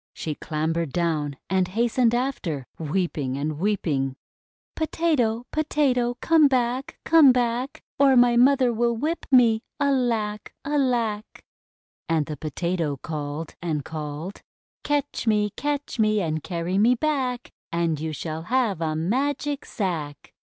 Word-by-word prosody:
She 155 - -3
clambered 160 +1 -2
down 155 -4 -1
and 190 -1 +1
hastened 235 +4 +2
after, 215 - -2
weeping 155 -5 -2
and 150 +1 -3
weeping: 155 -9 0 0.3
— - - -74
"Potato! 280 -8 0
Potato! 260 -6 +1
Comeback! 265 -5 +2
Comeback! 255 -5 +4 0.2
Or 275 -1 +6
my 245 -1 +5
mother 255 0 +4
will 235 0 +1
whip 315 +7 -2
me 235 -4 +5 0.2
I 285 -1 +2
Alack! 225 -6 -1
Alack!" 245 -7 -1 0.7
And 160 -2 +2
the 150 - -5
Potato 160 0 -2
called 150 +2 -5
and 155 -5 -2
called: 155 +4 -6 0.2
— - - -73
"Catch 290 -4 -1
me! 210 -1 +2
Catch 290 -3 -3
me! 215 -1 +3
And 155 -4 -1
carry 175 +4 -2
me 235 +4 +5
back! 260 -3 -1 0.2
And 170 -2 0
you 160 +1 -3
shall 155 +1 -5
have 235 -9 +1
a 155 -1 -1
Magic 275 - -1
Sack!" 160 -8 -4
215 Hz, 130 wpm, -24 LUFS, 160-255 Hz, 0.7 s, Or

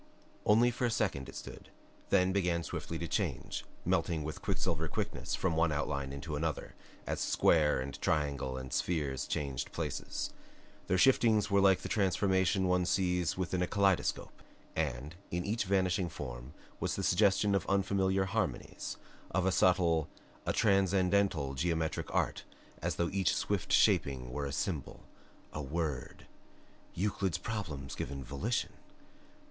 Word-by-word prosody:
Only 115 +4 +5
for 125 +1 -1
a - - +2
second 95 - -1
it - - -10
stood, - - -9 0.4
then 90 +1 +4
began 90 -3 +1
swiftly 80 +2 -4
to 85 - -4
change, - - -2 0.2
melting 80 -1 +1
with 80 +6 -5
quicksilver 95 -5 -1
quickness - - -2
from 90 -3 0
one 80 0 +3
outline 70 -2 -2
into 70 +2 -5
another 80 0 -2 0.3
as - - -2
square 75 -4 +3
and 70 +2 -5
triangle 70 -4 0
and 65 0 -6
spheres 75 -6 -1
changed 70 -4 -2
places. - - -3 0.6
Their 95 - +2
shiftings 110 -2 +4
were 100 0 +5
like 95 -1 +5
the - - -4
transformations 95 -1 +2
one 90 -1 +2
sees 90 -3 +1
within 90 0 -1
a 90 - +1
kaleidoscope. 100 -2 +1 0.3
And 65 +5 -2 0.2
in 90 0 -2
each 110 +2 0
vanishing 95 -2 +1
form 65 -3 -7 0.2
was - - -1
the - - -3
suggestion 100 0 +3
of 100 -3 0
unfamiliar 95 -1 +2
harmonies, 95 - -3 0.3
of 95 -1 0
a 95 - +3
subtle, 85 -4 +3 0.4
a - - +3
transcendental 95 -7 +2
geometric 80 +3 -1
art - - 0 0.4
as - - -1
though 85 0 0
each 95 -4 +2
swift - - -1
shaping 65 -3 +3
were 70 +2 -2
a - - -4
symbol, - - -3 0.5
a 75 - -3
WORD 75 -1 -3 0.7
Euclid's 95 -2 0
problems 80 -12 -5
given 70 -1 -5
volition! 80 - -2
90 Hz, 145 wpm, -32 LUFS, 75-95 Hz, 0.7 s, Only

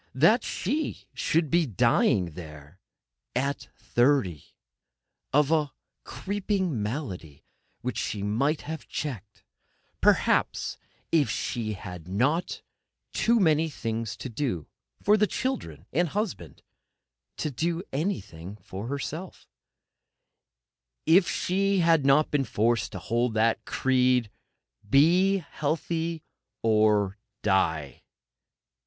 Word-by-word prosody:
That 215 - +5
she 290 - -2
should 160 -2 0
be 170 -2 +3
dying 110 -5 +2
there 75 0 -11 0.6
at 140 +3 -1
thirty, 120 - +1 0.8
of 150 +1 +3
a 150 -3 +1 0.3
creeping 195 - -2
malady 105 - -5 0.4
which 125 -1 -3
she 100 -2 -3
might 135 +10 +1
have 160 0 -7
checked, 110 - -6 0.6
perhaps, - - +2 0.3
if 155 -4 +3
she 110 -3 -2
had 90 -4 -8
not 145 - +1
had - - -7 0.5
too 235 0 +3
many 160 -3 +3
things 115 -4 -4
to - - -6
do 115 - -2 0.4
for 210 +1 +5
the 210 0 +3
children 210 - -3
and 170 +4 +2
husband, 185 - -4 0.7
to 155 - -2
do 165 +6 -1
anything 105 - -3
for 100 0 -8
herself—if 150 +6 -5 1.9
she 195 +1 +1
had 165 -4 +4
not 145 +3 +4
been 140 -2 +1
forced 115 +1 +1
to - - -4
hold 120 0 -1
the 115 +1 +3
creed: 125 -3 +2 0.6
Be 175 - +5
healthy, 160 +2 -2 0.4
or 105 -2 +3 0.2
die! 80 - +1
135 Hz, 105 wpm, -27 LUFS, 105-165 Hz, 1.9 s, That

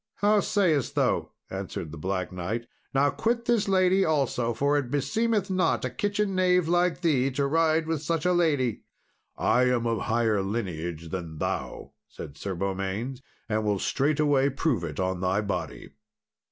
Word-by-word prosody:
"How 210 +1 +3
sayest 175 -10 +1
thou?" - - +1 0.2
answered 80 - -5
the 80 - -8
Black 90 0 -2
Knight. 95 +6 -3 0.3
"Now 140 +1 +3
quit 235 +1 -1
this 235 -4 +2
lady 190 0 +3
also, 135 -7 +1
for 140 +5 +1
it 140 -4 0
beseemeth 205 - 0
not 185 -7 +1
a 125 - -3
kitchen 205 +7 -1
knave 180 -2 +3
like 175 +1 +2
thee 140 -6 +2
to 140 +1 -1
ride 160 +2 +2
with 160 -2 -2
such 165 +1 -1
a 180 - +3
lady." 145 -9 +1 0.6
"I 125 +1 +3
am 125 -2 +1
of 115 -1 0
higher 110 -3 +1
lineage 85 -6 -4
than 85 -3 -5
thou," - - -4 0.2
said 70 - -9
Sir 95 +6 -4
Beaumains, 100 +7 -3 0.3
"and 110 -1 0
will 105 -1 +1
straightway 140 +3 +2
prove 135 - 0
it 75 -4 -5
on 95 -1 -1
thy 95 +2 +1
body." 100 -2 -4
135 Hz, 165 wpm, -27 LUFS, -, 0.6 s, How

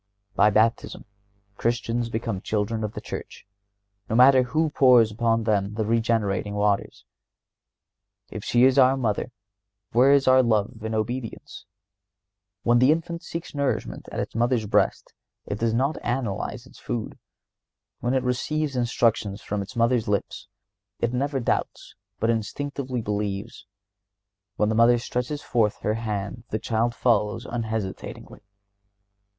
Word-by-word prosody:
By 105 - +4
Baptism 110 +3 +1 0.5
Christians 120 0 -1
become 110 -4 -3
children 110 +1 -2
of 105 0 -3
the - - -6
Church, - - -8 0.6
no 110 - 0
matter 130 +2 +7
who 155 +5 0
pours 125 -6 +5
upon 115 +1 +1
them 105 -2 0
the 110 -1 -1
regenerating 110 -3 0
waters. 105 -1 -1 1.3
If - - -6
she 120 0 +3
is 130 +1 +5
our 130 +1 +5
Mother, 120 0 -1 0.6
where 125 +4 +5
is 140 -1 +4
our 130 0 +7
love 110 -2 0
and 110 0 -2
obedience? 115 0 -4 1.0
When 120 0 +4
the 130 +4 +5
infant 170 +1 -2
seeks 165 0 -7
nourishment 140 - -2
at - - -4
its - - -4
mother's 120 0 +1
breast 105 - 0 0.3
it 105 - -4
does 115 0 +1
not 135 +7 -1
analyze 120 -5 -3
its - - -17
food. 115 -3 -5 0.8
When 120 +3 -1
it 130 - +1
receives 140 +3 -1
instructions 115 -4 0
from 105 0 -3
its 100 - -8
mother's 115 0 +2
lips 100 -1 -2 0.5
it 120 +1 -1
never 135 +2 -1
doubts, 120 - -2 0.3
but 115 +1 +2
instinctively 130 +2 -3
believes. 105 +1 -4 0.9
When 105 -1 +1
the - - +1
mother 115 +2 +5
stretches 125 +4 -3
forth 110 -4 +1
her 105 - 0
hand 110 0 -4
the 110 - -1
child 115 +2 -1
follows 115 0 +1
unhesitatingly. 110 -7 -5
115 Hz, 140 wpm, -25 LUFS, 105-125 Hz, 1.3 s, matter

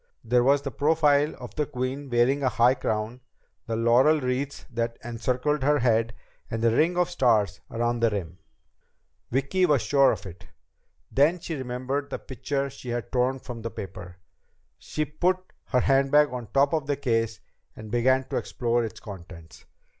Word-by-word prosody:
There 120 +1 +3
was 140 +2 +3
the 140 - -4
profile 150 +2 +2
of - - -10
the 150 -1 -1
queen 135 0 -4
wearing 125 +4 +2
a 130 - +2
high 120 +2 +4
crown, 110 0 -3 0.5
the 115 - -2
laurel 120 +7 +4
wreaths 135 +2 -3
that 115 0 -2
encircled 125 +5 -1
the 145 +2 +3
head, 115 -2 +1 0.3
and 115 0 -3
the 115 -1 +3
ring 170 +5 +2
of 180 -1 +3
stars 105 -7 +2
around 120 +1 -1
the 115 0 +3
rim. 90 -5 -5 0.9
Vicki 140 +9 +1
was 145 -5 +2
sure 140 -1 +4
of - - -5
it! 90 -1 -11 0.6
Then 150 +6 +3
she 165 - -5
remembered 130 +1 -3
the - - -3
picture 140 +2 -3
she 125 - -10
had 120 -1 -4
torn 130 +1 +1
from 120 -2 -8
the 115 - -4
paper. 90 -4 -8 0.6
She 155 - -3
put 175 +5 +1 0.3
her 125 -2 +1
handbag 135 +2 +3
on 125 -2 -4
the - - -22
top 140 +3 +3
of 155 -4 -1
the 145 -1 0
case 115 -4 0 0.4
and 110 -1 -10
began 130 +3 +3
to - - -1
explore 120 -1 -1
its 110 - -6
contents. 85 -5 -11
125 Hz, 175 wpm, -26 LUFS, 115-140 Hz, 0.9 s, high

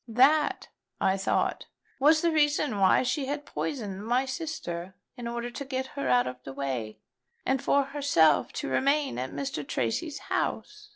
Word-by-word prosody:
That, 270 +6 +3 0.3
I 190 - +2
thought, 195 - 0 0.3
was 310 +4 +5
the 340 - +3
reason 295 -7 +2
why 190 +5 +5
she 260 +2 -1
had 290 +1 -3
poisoned 205 -9 -4
my 245 +4 +1
sister 260 - -5 0.2
in 240 -1 -6
order 235 +1 -4
to 280 - -5
get 260 -1 -3
her 140 -2 -2
out 125 0 +4
of 125 0 -6
the 135 - -7
way, 130 -6 -3 0.5
and 265 -1 +1
for 280 - +3
herself 275 - +3
to - - -4
remain 275 - +1
at 130 +1 -3
Mr. 140 +2 -4
Tracy's 115 -2 -2 0.2
house. - - -2
245 Hz, 165 wpm, -28 LUFS, -, 0.5 s, was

